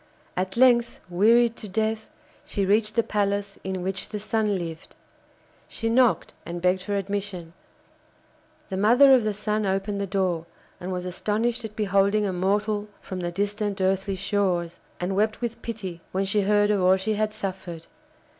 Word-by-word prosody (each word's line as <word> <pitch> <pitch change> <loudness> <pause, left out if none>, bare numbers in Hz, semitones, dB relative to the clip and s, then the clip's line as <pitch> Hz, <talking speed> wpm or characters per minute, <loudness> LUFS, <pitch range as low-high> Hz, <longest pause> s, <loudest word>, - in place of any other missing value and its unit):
At 185 +3 -2
length, 240 -2 +4
wearied 230 +5 +4
to 210 - -8
death, 220 +2 -1 0.3
she 200 - -2
reached 215 +2 +2
the 230 - +3
palace 200 -1 -1
in 190 -1 -3
which 190 0 -3
the 210 - -4
Sun 210 -1 0
lived. 165 -2 -7 0.7
She 225 - -3
knocked 245 0 +3
and 170 0 -5
begged 180 +1 +2
for 205 +2 -3
admission. 195 -4 -3 1.2
The 190 - -2
mother 245 +7 +6
of 255 -3 +5
the 215 -1 0
Sun 210 0 -1
opened 195 +1 -1
the 200 - -2
door, 180 -4 -1 0.3
and 180 +1 -5
was 180 -1 -3
astonished 220 +6 -1
at 215 -1 -8
beholding 200 0 +2
a 190 - -1
mortal 205 +3 0
from 185 - -6
the 175 -1 -2
distant 205 +2 -2
earthly 190 +1 +1
shores, 185 -3 -1 0.2
and 180 +2 -2
wept 215 +2 +1
with 235 -1 -4
pity 195 -7 -6
when 190 +1 0
she 205 +2 +2
heard 205 +1 +3
of 205 -2 +1
all 185 +1 +5
she 205 +3 -1
had 215 0 0
suffered. 190 -5 -6
200 Hz, 170 wpm, -25 LUFS, 185-215 Hz, 1.2 s, mother